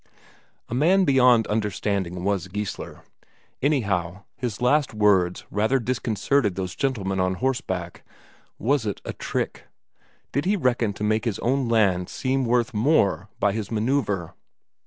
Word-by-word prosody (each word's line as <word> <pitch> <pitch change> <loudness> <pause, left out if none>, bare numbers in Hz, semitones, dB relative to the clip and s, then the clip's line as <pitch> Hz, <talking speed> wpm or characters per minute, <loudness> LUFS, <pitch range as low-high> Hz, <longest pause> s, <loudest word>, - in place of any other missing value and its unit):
A - - -6
man 180 +9 +4
beyond 125 -5 +5
understanding 100 -4 -2
was 100 -1 0
Geissler. 105 +2 -6 0.6
Anyhow, 100 - 0
his 120 -4 -4
last 130 0 +2
words 95 -4 +2
rather 110 +7 +2
disconcerted 120 -2 0
those 95 -1 -3
gentlemen 105 -9 -1
on 95 0 +1
horseback. 95 -7 -3 0.6
Was 125 0 +1
it 100 - -3
a - - -4
trick? - - -4 0.7
Did 140 +3 -1
he 200 +3 +2
reckon 120 - +1
to 105 - -6
make 110 +2 +1
his 115 -5 -1
own 130 0 0
land 95 -6 +2
seem 130 0 -1
worth 120 -1 +1
more 110 - +2
by 100 - +3
this 105 0 -4
manoeuvre? 110 - -1
110 Hz, 135 wpm, -24 LUFS, 95-130 Hz, 0.7 s, beyond